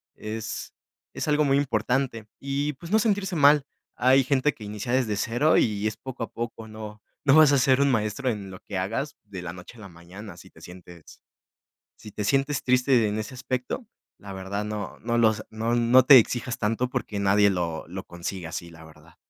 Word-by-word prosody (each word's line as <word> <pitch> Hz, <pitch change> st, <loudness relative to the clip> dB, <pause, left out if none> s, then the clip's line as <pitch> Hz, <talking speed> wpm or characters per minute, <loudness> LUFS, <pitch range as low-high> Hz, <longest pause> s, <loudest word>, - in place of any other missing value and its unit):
es 110 Hz, 0 st, -6 dB, 0.4 s
es -, -, -4 dB
algo 150 Hz, 0 st, +3 dB
muy 135 Hz, 0 st, +3 dB
importante, 125 Hz, -2 st, -1 dB
y 140 Hz, +2 st, -2 dB
pues, 170 Hz, +6 st, -11 dB
no 220 Hz, -, +4 dB
sentirse 200 Hz, -4 st, 0 dB
mal. 145 Hz, 0 st, +5 dB, 0.3 s
Hay 130 Hz, +2 st, +4 dB
gente 140 Hz, +2 st, +1 dB
que 110 Hz, -, -13 dB
inicia 105 Hz, +3 st, -4 dB
desde 125 Hz, -5 st, +1 dB
cero 120 Hz, +9 st, +2 dB
y 105 Hz, -1 st, +1 dB
es 110 Hz, -, -3 dB
poco 130 Hz, -3 st, -7 dB
a -, -, -7 dB
poco. 115 Hz, -1 st, -6 dB
No 110 Hz, -1 st, -9 dB, 0.2 s
no 135 Hz, -, +5 dB
vas 155 Hz, -2 st, +7 dB
a 140 Hz, -, +5 dB
ser 130 Hz, +1 st, +3 dB
un 140 Hz, -, +3 dB
maestro 110 Hz, +3 st, -1 dB
en 100 Hz, -4 st, -4 dB
lo 95 Hz, -, -10 dB
que 100 Hz, -, -6 dB
hagas 115 Hz, +10 st, -3 dB
de 100 Hz, -4 st, -8 dB
la 85 Hz, -1 st, -6 dB
noche 90 Hz, +6 st, -12 dB
a -, -, -13 dB
la 100 Hz, -, -9 dB
mañana. 90 Hz, +3 st, -11 dB
Si -, -, -14 dB
te -, -, -19 dB
sientes 90 Hz, -2 st, -14 dB, 0.8 s
si 105 Hz, -, -12 dB
te 105 Hz, -, -4 dB
sientes 135 Hz, +5 st, 0 dB
triste 125 Hz, -3 st, +3 dB
en 105 Hz, -, -2 dB
ese 110 Hz, +4 st, -6 dB
aspecto, 130 Hz, -, -4 dB, 0.3 s
la 100 Hz, -, -11 dB
verdad 95 Hz, +2 st, -4 dB
no 105 Hz, -1 st, -5 dB
no 120 Hz, +1 st, -1 dB
lo 110 Hz, -2 st, +4 dB, 0.2 s
no 115 Hz, +2 st, -1 dB
no 120 Hz, +2 st, +5 dB
te 135 Hz, -2 st, +10 dB
exijas 120 Hz, +2 st, -2 dB
tanto 115 Hz, +3 st, -1 dB
porque 105 Hz, -4 st, -4 dB
nadie 100 Hz, +1 st, +4 dB
lo 85 Hz, -4 st, -2 dB
lo 95 Hz, +2 st, -6 dB
consigue 85 Hz, 0 st, -6 dB
así, 85 Hz, +1 st, -6 dB
la 80 Hz, -1 st, -14 dB
verdad. 80 Hz, +1 st, -18 dB
115 Hz, 205 wpm, -25 LUFS, 100-130 Hz, 0.8 s, te